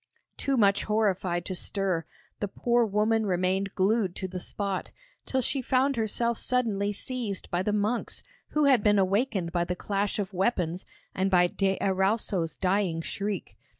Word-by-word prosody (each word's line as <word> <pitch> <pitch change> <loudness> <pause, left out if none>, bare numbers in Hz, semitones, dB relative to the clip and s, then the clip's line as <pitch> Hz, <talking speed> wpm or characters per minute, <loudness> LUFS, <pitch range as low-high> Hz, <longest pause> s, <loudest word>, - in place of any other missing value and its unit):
Too 275 -1 0
much 200 -3 +3
horrified 190 -5 0
to 190 - -2
stir, 185 -2 0 0.3
the 205 - -1
poor 240 +4 +1
woman 215 +1 +1
remained 185 +1 0
glued 195 -1 +1
to 190 - -3
the 185 0 -5
spot, 195 +1 -3 0.4
till 260 - +1
she 270 +3 0
found 265 +2 +2
herself 235 +1 0
suddenly 215 -5 0
seized 215 -2 -4
by 175 - +1
the 210 - 0
monks 210 +3 -1 0.2
who 300 -1 +1
had 265 -5 +5
been 205 0 +4
awakened 195 -2 +1
by 175 -1 +1
the 180 +1 -2
clash 200 +2 -1
of 200 -2 -3
weapons 180 -3 0 0.3
and 190 +1 0
by 180 -2 +5
de 190 +2 0
Erauso's 190 -3 +1
dying 185 -3 0
shriek. 200 +4 -4
200 Hz, 160 wpm, -28 LUFS, 185-225 Hz, 0.4 s, had